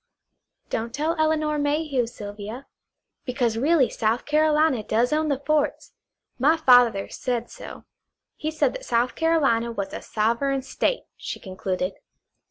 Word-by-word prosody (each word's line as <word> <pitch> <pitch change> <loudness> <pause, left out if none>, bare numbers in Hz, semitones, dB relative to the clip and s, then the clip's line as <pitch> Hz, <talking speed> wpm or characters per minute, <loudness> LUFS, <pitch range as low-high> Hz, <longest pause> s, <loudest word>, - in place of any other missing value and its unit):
"Don't 230 +2 -3
tell 315 +3 0
Elinor 310 -1 +1
Mayhew, 290 -4 0
Sylvia. 210 +3 -8 0.6
Because 245 -3 -1
really 280 +2 +3
South 225 +2 -1
Carolina 305 -3 +3
does 230 +6 +1
own 310 +1 +1
the 280 - +1
forts. 295 +1 -1 0.5
My 305 +6 +4
father 245 -9 +5
said 240 -2 -3
so. - - -10 0.5
He 310 - -3
said 300 -4 +1
that - - -7
South 240 +1 +1
Carolina 275 -8 +2
was 200 -4 -4
a - - -5
Sovereign 235 +5 0
State," - - -1
she - - -6
concluded. 185 -1 -3
255 Hz, 135 wpm, -24 LUFS, 230-305 Hz, 0.6 s, father